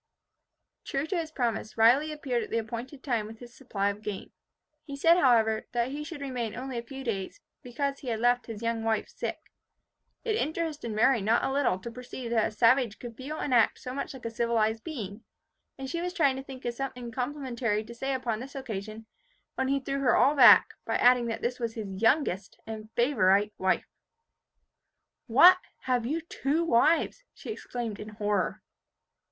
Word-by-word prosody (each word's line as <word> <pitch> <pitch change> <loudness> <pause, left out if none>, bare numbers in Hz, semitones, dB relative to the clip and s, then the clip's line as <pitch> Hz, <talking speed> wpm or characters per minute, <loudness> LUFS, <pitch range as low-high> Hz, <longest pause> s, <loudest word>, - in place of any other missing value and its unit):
True 275 +1 -2
to 345 - -3
his 330 -2 -2
promise, 235 -7 -2
Riley 255 +8 +5
appeared 270 -5 -2
at - - -6
the 230 - -1
appointed 235 +5 -5
time 235 -6 -1
with 225 +1 -10
his 240 +1 -13
supply 205 -7 -1
of 205 +1 -10
game. 205 -3 -6 0.5
He 280 - -7
said, 330 +5 +5
however, 225 -6 +3
that 240 +1 0
he 295 +2 -4
should 300 -1 -8
remain 245 -5 -3
only 255 -1 -4
a - - -4
few 270 +3 -9
days, 220 - -4 0.2
because 275 +2 -3
he 265 - -11
had 225 -2 -1
left 245 +1 +2
his 225 -1 -7
young 230 -1 -1
wife 220 -1 0
sick. - - -6 0.7
It 445 -3 0
interested 315 - -2
Mary 230 +2 +3
not 220 +4 +2
a - - 0
little 275 -9 +1
to 210 +5 -8
perceive 245 0 -7
that 225 -2 +3
a - - -6
savage 230 0 +3
could 240 -2 -9
feel 280 +6 -6
and 275 - -2
act 235 -2 +4
so 255 - -7
much 275 0 -4
like 255 - -11
a 230 - -3
civilized 225 -1 0
being; 225 - -6 0.5
and 270 - -6
she 335 +5 -3
was 360 +1 -3
trying 285 -7 +3
to 265 - -6
think 265 -2 -10
of 240 - -1
something 250 -2 -5
complimentary 250 -4 -2
to 230 +2 -10
say 265 +3 -2
upon 240 -4 -2
this 270 +3 -9
occasion, 220 -4 -6 0.5
when 265 - -1
he 275 +1 +1
threw 275 +1 -3
her 255 -3 +3
all 275 - +5
aback, 290 - +8
by - - -2
adding, 245 -1 +5
that 225 - -4
this 245 +1 -1
was 230 -2 -3
his 200 -3 -6
youngest 225 - +1
and 215 -1 -7
favourite 210 -5 +3
wife. 185 -1 +1 1.4
"What! 350 +10 +8 0.2
have 245 -2 0
you 315 +5 -1
two 315 0 -1
wives?" 330 - +2
she - - -7
exclaimed 235 - -5
in 215 - -7
horror. 210 -2 -1
245 Hz, 190 wpm, -28 LUFS, 225-275 Hz, 1.4 s, aback